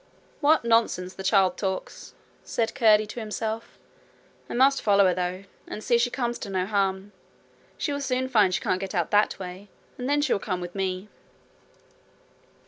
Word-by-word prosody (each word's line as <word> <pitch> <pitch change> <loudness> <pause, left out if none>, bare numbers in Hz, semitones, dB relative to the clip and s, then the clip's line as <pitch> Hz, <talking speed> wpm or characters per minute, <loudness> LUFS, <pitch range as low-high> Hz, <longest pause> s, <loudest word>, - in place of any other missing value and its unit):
'What 305 -3 +3
nonsense 225 -6 +2
the 190 - -8
child 190 -1 +3
talks!' 190 -2 -5 0.3
said 225 -1 -1
Curdie 215 -3 +4
to 215 +3 -7
himself. 220 +1 -4 0.7
'I - - -4
must 270 +2 +4
follow 200 -2 +4
her, 185 - +3
though, 180 +1 -3 0.2
and 215 - -7
see 240 - 0
that 235 - +5
she 245 - +2
comes 240 -2 -2
to 205 - -6
no 185 -1 -1
harm. 195 -1 -1 0.7
She 290 - -2
will 285 - -3
soon 260 -1 -1
find 210 -7 +4
she 180 - -1
can't 185 - 0
get 195 +1 -5
out 175 -3 0
that 205 +1 +3
way, 185 +2 -8 0.3
and 250 +2 -3
then 290 0 +2
she 290 - +2
will - - 0
come 185 -2 -3
with 175 0 -7
me.' 190 0 -3
205 Hz, 185 wpm, -26 LUFS, 190-235 Hz, 0.7 s, that